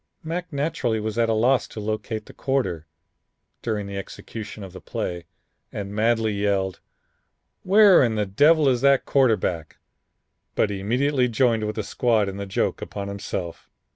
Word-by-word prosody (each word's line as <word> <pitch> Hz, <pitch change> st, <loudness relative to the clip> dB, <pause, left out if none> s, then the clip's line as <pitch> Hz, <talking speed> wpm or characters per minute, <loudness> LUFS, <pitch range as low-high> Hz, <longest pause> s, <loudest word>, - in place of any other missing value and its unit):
Mac 170 Hz, +3 st, -4 dB
naturally 140 Hz, -6 st, -1 dB
was 110 Hz, +2 st, -3 dB
at 115 Hz, -1 st, +2 dB
a -, -, +3 dB
loss 120 Hz, +4 st, +2 dB
to -, -, -9 dB
locate 110 Hz, +1 st, -3 dB
the -, -, -13 dB
quarter, 95 Hz, -, -2 dB, 0.7 s
during 105 Hz, -3 st, -2 dB
the 100 Hz, 0 st, -6 dB
execution 105 Hz, +2 st, -8 dB
of 95 Hz, -2 st, -10 dB
the 95 Hz, -, -10 dB
play 85 Hz, -1 st, -4 dB, 0.4 s
and 100 Hz, -1 st, -5 dB
madly 110 Hz, +1 st, +1 dB
yelled, 100 Hz, -2 st, -1 dB, 0.8 s
'Where 200 Hz, 0 st, +6 dB
in 115 Hz, -3 st, +1 dB
the 105 Hz, -1 st, 0 dB
devil 145 Hz, +10 st, +4 dB
is 125 Hz, -3 st, +2 dB
that 140 Hz, -1 st, +4 dB
quarterback?' 105 Hz, -, +1 dB, 0.8 s
But 105 Hz, -, +2 dB
immediately 125 Hz, +7 st, +1 dB
joined 115 Hz, -2 st, +1 dB
with 105 Hz, -, -3 dB
the 110 Hz, -, -2 dB
squad 110 Hz, -1 st, +1 dB
in 95 Hz, -, -7 dB
the 100 Hz, 0 st, -5 dB
joke 95 Hz, -, -1 dB
upon 100 Hz, -1 st, -5 dB
himself." 100 Hz, -3 st, -5 dB
110 Hz, 160 wpm, -24 LUFS, 100-130 Hz, 0.8 s, Where